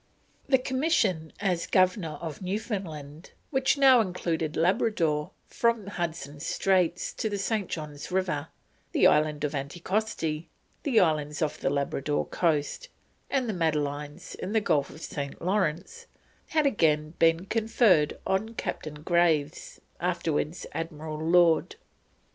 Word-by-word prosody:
The 265 Hz, -, +6 dB
commission 255 Hz, -, 0 dB
as 185 Hz, -4 st, 0 dB
Governor 185 Hz, -4 st, +2 dB
of 160 Hz, 0 st, -6 dB
Newfoundland, 180 Hz, -7 st, -5 dB, 0.2 s
which 265 Hz, +1 st, +2 dB
now 265 Hz, -3 st, +7 dB
included 170 Hz, -5 st, -2 dB
Labrador 165 Hz, -3 st, +1 dB, 0.2 s
from 235 Hz, -3 st, 0 dB
Hudson's 165 Hz, -6 st, -4 dB
Straits 185 Hz, -2 st, +1 dB
to 220 Hz, -, -2 dB
the 205 Hz, -, -2 dB
St. 200 Hz, -1 st, -1 dB
John's 150 Hz, -1 st, -6 dB
River, 180 Hz, -5 st, -1 dB, 0.5 s
the -, -, +4 dB
island 150 Hz, -1 st, +3 dB
of 150 Hz, 0 st, -1 dB
Anticosti, 165 Hz, +2 st, -2 dB, 0.3 s
the 255 Hz, -6 st, +3 dB
islands 155 Hz, -2 st, +1 dB
off 150 Hz, -, -2 dB
the -, -, 0 dB
Labrador 140 Hz, +1 st, -1 dB
coast, 165 Hz, -, -1 dB, 0.4 s
and 265 Hz, -3 st, 0 dB
the 220 Hz, -, -1 dB
Madelines 150 Hz, -1 st, -2 dB
in 195 Hz, -, -5 dB
the 220 Hz, -, +4 dB
Gulf 145 Hz, -9 st, +1 dB
of 155 Hz, -, -12 dB
St. 140 Hz, -4 st, -5 dB
Lawrence, 190 Hz, -, -1 dB, 0.4 s
had 310 Hz, -3 st, +1 dB
again 155 Hz, -, +2 dB
been 165 Hz, +2 st, +4 dB
conferred 215 Hz, -, +3 dB
on 215 Hz, +4 st, -1 dB
Captain 155 Hz, -7 st, -4 dB, 1.0 s
(afterwards 170 Hz, -2 st, -1 dB
Admiral 155 Hz, -1 st, -5 dB
Lord) 170 Hz, -, +4 dB
Graves. 480 Hz, -, -32 dB
170 Hz, 125 wpm, -28 LUFS, 150-210 Hz, 1.0 s, now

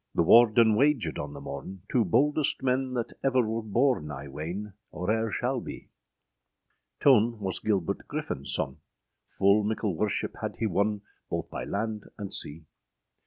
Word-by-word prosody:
â -, -, -48 dB
The 85 Hz, -, +4 dB
Warden 115 Hz, +3 st, +6 dB
wagèd 120 Hz, -, +2 dB
{135b} -, -, -2 dB
on 75 Hz, 0 st, -7 dB
the -, -, -9 dB
morne, 95 Hz, -1 st, -7 dB
Two 120 Hz, -, +2 dB
boldest 145 Hz, -, +1 dB
men 130 Hz, 0 st, 0 dB
that 120 Hz, -2 st, -2 dB
ever 130 Hz, -4 st, +3 dB
wer 115 Hz, +1 st, -1 dB
borne, 115 Hz, -, +1 dB
I 70 Hz, -1 st, -6 dB
weyne, 85 Hz, +9 st, -5 dB, 0.2 s
or 90 Hz, +4 st, -2 dB
ere 110 Hz, 0 st, +1 dB
shall 125 Hz, +3 st, -1 dB
bee: -, -, -9 dB, 1.1 s
Tone 120 Hz, -4 st, +4 dB
was 95 Hz, -2 st, -2 dB
Gilbert 100 Hz, -6 st, -1 dB
Griffin 70 Hz, -, -4 dB
sonne, 65 Hz, -, -1 dB, 0.5 s
Ful 100 Hz, +2 st, +3 dB
mickle 105 Hz, -3 st, -1 dB
worship 105 Hz, +5 st, -2 dB
hadde -, -, -3 dB
hee -, -, -1 dB
wonne, 100 Hz, +1 st, 0 dB, 0.3 s
Both -, -, -3 dB
by -, -, -4 dB
land 105 Hz, 0 st, -3 dB
and 100 Hz, -2 st, -5 dB
sea. 80 Hz, +2 st, -4 dB
105 Hz, 165 wpm, -28 LUFS, 95-120 Hz, 1.1 s, Warden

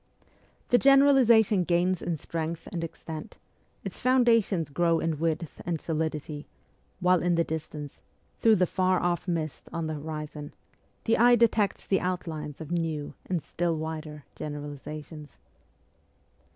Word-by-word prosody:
The 245 Hz, -, +5 dB
generalization 260 Hz, -8 st, +6 dB
gains 175 Hz, +1 st, +1 dB
in 170 Hz, -2 st, -2 dB
strength 165 Hz, +2 st, -4 dB
and 170 Hz, -2 st, -3 dB
extent; 160 Hz, -1 st, -7 dB, 0.5 s
its -, -, -6 dB
foundations 230 Hz, -, +3 dB
grow 165 Hz, +2 st, +2 dB
in 160 Hz, -2 st, -1 dB
width 165 Hz, -1 st, -2 dB
and 170 Hz, -2 st, -2 dB
solidity; 155 Hz, -2 st, -3 dB, 0.5 s
while 180 Hz, -1 st, +3 dB
in 175 Hz, 0 st, +2 dB
the 170 Hz, -, +3 dB
distance, 150 Hz, -3 st, -6 dB, 0.4 s
through 225 Hz, -1 st, +5 dB
the 185 Hz, -2 st, +3 dB
far 185 Hz, +1 st, +1 dB
off 175 Hz, +1 st, -1 dB
mist 160 Hz, -3 st, -3 dB
on 165 Hz, -1 st, -3 dB
the 155 Hz, -, -2 dB
horizon, 150 Hz, -1 st, -6 dB, 0.5 s
the 225 Hz, -1 st, +2 dB
eye 240 Hz, +1 st, +7 dB
detects 220 Hz, -4 st, +2 dB
the 190 Hz, -, +2 dB
outlines 160 Hz, -5 st, -4 dB
of 160 Hz, 0 st, -8 dB
new 160 Hz, -4 st, -2 dB
and 175 Hz, -5 st, -1 dB
still 170 Hz, +2 st, -1 dB
wider 155 Hz, -1 st, -5 dB
generalizations. 150 Hz, +1 st, -7 dB
165 Hz, 135 wpm, -28 LUFS, 155-185 Hz, 0.5 s, eye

